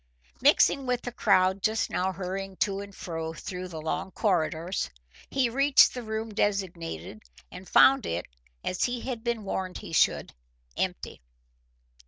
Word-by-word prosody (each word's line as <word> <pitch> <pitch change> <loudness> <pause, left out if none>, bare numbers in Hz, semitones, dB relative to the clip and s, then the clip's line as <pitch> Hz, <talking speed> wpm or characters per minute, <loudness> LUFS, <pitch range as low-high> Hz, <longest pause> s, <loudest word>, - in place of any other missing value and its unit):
Mixing 275 -2 +4
with 250 -1 0
the 245 - -4
crowd 185 -4 +3
just 220 +3 0
now 185 +1 0
hurrying 190 +1 -5
to 195 +1 0
and 200 -1 -9
fro 160 -2 -5
through 180 +4 -6
the 165 -3 -7
long 180 +5 -3
corridors, 175 - 0 0.4
he 270 -2 +2
reached 275 +4 +5
the 250 - -5
room 220 -1 -4
designated 170 - -2 0.3
and 180 +1 -10
found 270 0 +6
it, 85 +2 -2 0.4
as 185 - 0
he 245 -1 -2
had 245 -4 -5
been 235 -3 -1
warned 190 -2 -3
he - - -9
should, - - +2 0.4
empty. - - -3
195 Hz, 150 wpm, -28 LUFS, 180-225 Hz, 0.4 s, found